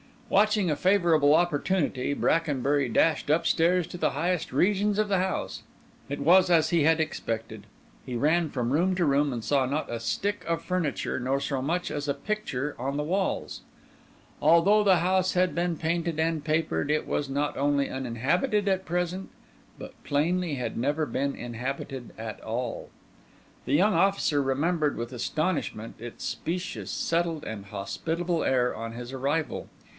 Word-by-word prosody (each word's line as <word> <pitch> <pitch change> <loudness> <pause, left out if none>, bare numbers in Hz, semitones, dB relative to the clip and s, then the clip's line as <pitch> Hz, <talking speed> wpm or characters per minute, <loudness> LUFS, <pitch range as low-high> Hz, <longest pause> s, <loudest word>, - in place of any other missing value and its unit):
Watching 210 -3 +3
a 150 - -1
favourable 165 -5 +4
opportunity, 155 -4 +1
Brackenbury 145 -4 +1
dashed 150 +7 +2
upstairs 170 +2 +3
to 180 - -8
the - - +1
highest 170 +3 -1
regions 205 +1 +2
of 215 -1 +1
the 195 -2 +2
house. 185 0 -2 0.5
It 140 0 -4
was 180 +5 +5
as 165 -3 +4
he 170 -3 +3
had 160 +1 +4
expected. 110 -8 -4 0.4
He 125 - -5
ran 155 +6 +2
from 125 -3 -2
room 180 +6 +2
to 180 - +1
room, 140 -1 +2
and 115 -2 -4
saw 140 0 +2
not 145 +2 -2
a 115 - -3
stick 200 - -2
of 165 0 -1
furniture 180 -7 -1
nor 130 +2 0
so 140 -2 -2
much 170 +6 -1
as 145 0 -3
a 140 - +1
picture 150 -10 -3
on 135 +3 -2
the 150 - -1
walls. 190 +5 -2 0.8
Although 170 +7 +5
the 190 -3 +5
house 185 +2 +2
had 180 0 +2
been 175 0 0
painted 165 0 -1
and 160 -1 0
papered, 155 -1 0
it 150 +1 +1
was 145 - -2
not 145 +2 -1
only 140 0 +1
uninhabited 145 - 0
at 190 -1 0
present, 180 +2 -2 0.5
but - - -11
plainly 165 +2 0
had 120 -4 -4
never 145 +5 0
been 140 +2 -2
inhabited 125 +2 -5
at 110 -1 -6
all. 115 +2 -4 0.8
The - - -1
young 195 +8 +4
officer 190 -8 +2
remembered 150 +3 0
with 120 +1 -5
astonishment 135 -3 -2
its 120 +1 -8
specious, 180 +2 -4
settled, 165 -2 -1
and 105 -3 -6
hospitable 160 - -2
air 125 -1 +2
on 115 +1 -6
his 120 +1 -7
arrival. 140 +4 -2
155 Hz, 160 wpm, -27 LUFS, 135-180 Hz, 0.8 s, was